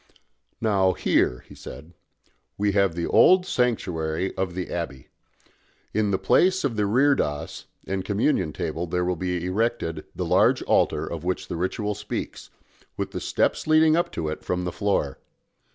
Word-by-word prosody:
"Now 100 -4 +2
here," 60 - +1
he - - -13
said, 75 +6 -11 0.6
"we 105 0 +1
have 100 -4 +2
the 85 -1 -2
old 185 0 +5
sanctuary 95 - -1
of 95 -2 -2
the 90 -1 -4
abbey. 70 -6 -5 0.8
In 110 -1 +1
the 95 - +1
place 185 - +3
of 135 -5 -1
the 105 -1 +1
reredos 100 - +1 0.2
and 95 -1 -2
Communion 100 - +1
table 80 +4 -3
there 90 +1 -1
will 90 0 0
be 90 0 -2
erected 90 -5 -1
the - - -2
large - - +3
altar - - +2
of 85 -2 -6
which 90 +1 -3
the - - -3
ritual 105 +4 -2
speaks, - - -6 0.5
with - - -3
the - - -5
steps - - 0
leading 155 0 +5
up 170 0 0
to 80 - -3
it 75 - -5
from 90 0 -2
the 90 - -2
floor. 95 -10 -1
95 Hz, 165 wpm, -25 LUFS, 85-110 Hz, 0.8 s, old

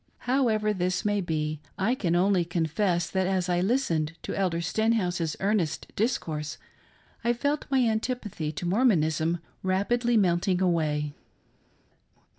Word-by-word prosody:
However 225 -5 +2
this 185 +2 -1
may 205 -1 +1
be, 155 -3 -2 0.2
I 205 +6 +2
can 175 -9 0
only 185 0 +3
confess 170 +1 0
that 190 -1 0
as 185 -1 0
I 175 -1 +1
listened 175 - +1
to - - -4
Elder 180 -4 0
Sten 220 +7 +1
house's 175 -7 -1
earnest 195 -6 -1
discourse, 155 - -2 0.7
I 235 +1 +3
felt 285 +5 -1
my 260 -3 +3
antipathy 220 -8 -2
to 155 - -5
Mormonism 170 - +2 0.2
rapidly 235 +6 +1
melting 180 -1 +2
away. 155 -5 0
185 Hz, 130 wpm, -27 LUFS, 165-220 Hz, 0.7 s, only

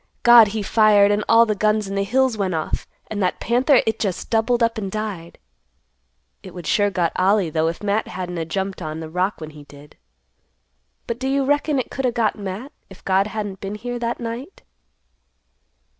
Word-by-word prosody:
God, 240 -2 +8
he 210 +1 -3
fired 205 -1 +4
and 205 +1 0
all 230 +1 +6
the 215 - 0
guns 215 0 +1
in 195 - -5
the 200 0 0
hills 260 +3 +1
went 190 -4 -1
off, 155 -1 -3 0.2
and 210 -2 -5
that 180 - 0
panther 250 +3 +3
it 220 0 -1
just 190 -4 -3
doubled 235 +2 +2
up 230 -1 0
and 195 -2 -5
died. 205 -6 -5 1.0
It 185 -2 -12
would 175 -2 -8
sure 205 +4 +2
got 175 -4 0
Ollie, 190 -2 +2
though, 160 +1 +1
if 165 +5 -4
Matt 205 +1 0
hadn't 180 -1 -5
a 165 - -2
jumped 190 +3 -4
on 155 -1 -5
the 160 -1 -8
rock 185 +4 -1
when 155 -1 -8
he 150 -1 -13
did. 145 +1 -16 1.1
But 235 +1 -4
do 265 - -2
you 275 0 +1
reckon 290 +1 +1
it 255 - -3
could 270 -2 -1
o' - - +1
got 230 -3 0
Matt, 205 +6 -6 0.2
if 190 - -16
God 195 +1 +2
hadn't 205 -3 -5
been 195 +1 -5
here 245 +3 -5
that 235 0 -3
night?" 235 +8 -7
205 Hz, 205 wpm, -21 LUFS, 185-230 Hz, 1.1 s, God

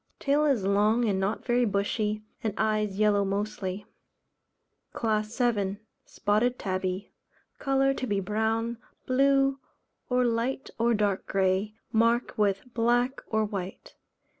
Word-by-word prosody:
Tail 290 +2 +2
is 270 -9 +2
long 210 +4 +3
and 200 -3 +1
not 195 +3 -2
very 245 0 +2
bushy, 210 0 -1 0.2
and 215 -3 -1
eyes 215 -2 0
yellow 210 -1 +3
mostly. 200 0 -3 1.1
CLASS 215 0 -1
VII. 205 -6 +1 0.3
Spotted 230 +5 0
Tabby. 185 0 -3 0.5
Colour 270 0 +2
to 260 - -4
be 205 -2 0
brown, 220 +4 -1 0.3
blue, 275 +1 +3 0.5
or 250 0 +2
light 240 +3 -1
or 235 0 +3
dark 205 -2 0
grey, 195 +2 +1 0.2
marked 230 +2 +2
with 200 -2 +1
black 245 +3 +1
or 220 -1 +1
white. 195 -3 -6
215 Hz, 125 wpm, -28 LUFS, 200-240 Hz, 1.1 s, long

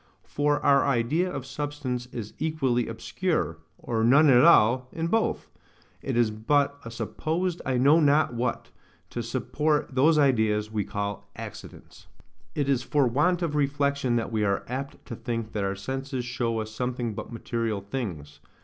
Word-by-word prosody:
For 145 0 0
our 140 -1 +4
idea 140 +8 +1
of 135 -2 -5
substance 135 -3 -4
is 115 -4 -7
equally 135 -6 0
obscure, 115 - -2 0.2
or 115 -2 -2
none 140 +5 +6
at 125 0 +6
all, 125 -5 +5
in 165 - -3
both: 225 +6 0 0.5
it - - -2
is 120 -3 +3
but 140 +6 +1
a 115 - -7
supposed 160 - -2
I 130 -1 +1
know 140 +6 +5
not 145 -3 +3
what, 120 0 -3 0.4
to 120 - -3
support 145 +5 -1
those 150 +5 +4
ideas 110 -7 +2
we 105 -3 -1
call 100 0 -4
accidents. - - -10 0.5
It 145 -2 0
is 135 -3 +2
for 140 +2 +2
want 165 +9 +2
of 160 -3 -1
reflection 140 -3 +1
that 115 -1 -1
we 110 -1 0
are 100 -1 0
apt 135 +3 -6
to 120 - -6
think 115 -1 -4
that 105 - -2
our 100 0 -1
senses 130 +4 -4
show 120 -2 -1
us 110 0 -8
nothing 125 -2 -2
but - - -7
material 115 -3 -2
things. 95 - -6
125 Hz, 165 wpm, -26 LUFS, 115-145 Hz, 0.5 s, none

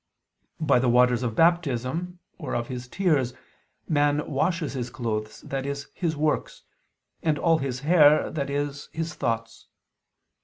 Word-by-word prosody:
By 145 -5 +3
the 125 0 +2
waters 125 0 +4
of 115 -3 -2
Baptism 165 +1 +1 0.2
or 145 -7 -4
of 120 0 -2
his 125 -1 -5
tears 145 -7 +1 0.5
man 145 -1 +2
washes 160 +2 -1
his 125 -2 -3
clothes, 110 -4 -4
i.e. 135 +1 -2 0.2
his 165 -4 -2
works, 150 0 -1 0.6
and 155 -2 +1
all 165 0 +3
his 130 -2 -3
hair, 150 -1 +5
i.e. 145 0 -1 0.2
his 165 +2 -3
thoughts. 115 -1 -3
140 Hz, 130 wpm, -26 LUFS, 125-160 Hz, 0.6 s, hair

